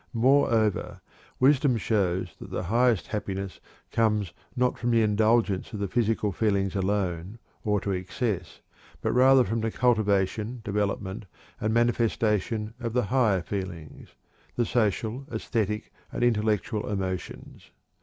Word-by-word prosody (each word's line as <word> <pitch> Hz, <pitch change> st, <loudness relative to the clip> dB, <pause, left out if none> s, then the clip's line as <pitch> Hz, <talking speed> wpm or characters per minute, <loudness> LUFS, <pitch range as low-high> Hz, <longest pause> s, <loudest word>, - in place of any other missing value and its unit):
Moreover, 115 Hz, -4 st, +2 dB, 0.4 s
wisdom 135 Hz, -1 st, +4 dB
shows 95 Hz, -5 st, 0 dB
that -, -, -9 dB
the -, -, -3 dB
highest 115 Hz, +2 st, +2 dB
happiness 100 Hz, -2 st, -4 dB, 0.3 s
comes 105 Hz, -6 st, +1 dB, 0.2 s
not 125 Hz, 0 st, +1 dB
from 120 Hz, -, -1 dB
the 115 Hz, -1 st, +4 dB
indulgence 110 Hz, -1 st, +2 dB
of 105 Hz, -, -4 dB
the 100 Hz, -, -1 dB
physical 110 Hz, -1 st, 0 dB
feelings 100 Hz, -1 st, 0 dB
alone, 95 Hz, 0 st, -1 dB, 0.3 s
or 105 Hz, -2 st, +1 dB
to 100 Hz, -, -2 dB
excess, 95 Hz, -, -3 dB, 0.4 s
but -, -, +1 dB
rather 130 Hz, +1 st, +6 dB
from 115 Hz, +2 st, -2 dB
the 115 Hz, -, 0 dB
cultivation, 110 Hz, 0 st, +1 dB
development, 100 Hz, 0 st, -2 dB, 0.3 s
and 110 Hz, -, 0 dB
manifestation 115 Hz, -2 st, +1 dB
of 115 Hz, -3 st, -3 dB
the 125 Hz, 0 st, +2 dB
higher 110 Hz, -9 st, +3 dB
feelings 90 Hz, -4 st, -6 dB, 0.4 s
the 120 Hz, -, +1 dB
social, 115 Hz, +3 st, -1 dB
æsthetic, 105 Hz, -5 st, -2 dB, 0.2 s
and -, -, -2 dB
intellectual 110 Hz, -2 st, +1 dB
emotions. 95 Hz, -3 st, -5 dB
105 Hz, 125 wpm, -27 LUFS, 95-115 Hz, 0.4 s, rather